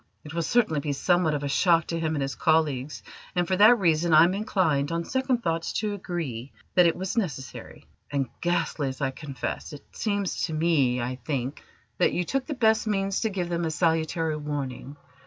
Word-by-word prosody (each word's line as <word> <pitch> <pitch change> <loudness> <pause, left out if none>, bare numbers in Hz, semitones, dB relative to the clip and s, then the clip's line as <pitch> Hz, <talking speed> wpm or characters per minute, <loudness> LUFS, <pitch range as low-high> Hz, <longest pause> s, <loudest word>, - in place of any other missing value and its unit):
"It 150 - -9
will 170 - -1
certainly 165 -5 +2
be 145 0 -2
somewhat 175 +1 +2
of 145 - -3
a - - -1
shock 165 +3 +3
to 165 - -1
him 160 -1 -1
and 140 - -1
his 135 0 -3
colleagues, 155 -3 0 0.3
and 175 -1 +1
for 185 - +1
that 220 +5 +7
reason 170 -3 +2
I 155 - +9
am 175 +2 +3
inclined, 165 -8 0
on 170 0 -1
second 260 0 0
thoughts, 165 -2 -1
to 215 -1 -1
agree 160 - -5 0.2
that 180 -1 +6
it 165 - +1
was 190 +1 -4
necessary, 145 - -4 0.2
and 140 -2 -1
ghastly, 170 -4 0
as 130 - -7
I 135 -1 0
confess; 140 +1 -6
it 145 - -11
seems 205 -3 -1
to 160 - -4
me, 150 -6 +2
I 125 +1 -3
think, 135 0 -3 0.4
that 180 - +3
you 180 - 0
took 270 +9 -2
the 295 - -3
best 220 -2 +2
means 195 -2 0
to 220 - +1
give 180 -4 -3
them 170 0 -1
a 165 - 0
salutary 160 0 0
warning. 145 -2 -5
165 Hz, 205 wpm, -26 LUFS, 145-185 Hz, 0.4 s, I